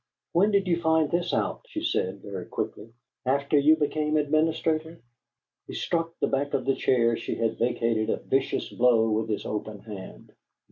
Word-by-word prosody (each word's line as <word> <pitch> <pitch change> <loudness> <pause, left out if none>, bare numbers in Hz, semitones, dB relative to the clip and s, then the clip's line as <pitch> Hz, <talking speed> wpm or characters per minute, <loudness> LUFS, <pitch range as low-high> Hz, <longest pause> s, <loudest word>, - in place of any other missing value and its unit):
"When 190 +5 +4
did 200 -2 +2
you 170 -1 +1
find 160 -2 +2
this 175 0 0
out?" - - -1
she 315 - -5
said, 100 - -1
very 95 -3 -6
quickly. 110 +2 -5 0.3
"After 140 +3 +2
you 150 +3 +6
became 155 0 0
administrator?" 155 +2 0 0.7
He - - -7
struck 165 0 -1
the - - +2
back 140 +1 -1
of 130 - -1
the 135 - +3
chair 115 -3 +2
she 115 - -4
had 115 -1 -1
vacated 115 -2 +1
a - - +1
vicious 135 0 -1
blow 115 -2 +3
with 110 +1 0
his 105 - -2
open 105 -1 -4
hand. 100 -4 -10
140 Hz, 175 wpm, -27 LUFS, 115-160 Hz, 0.7 s, you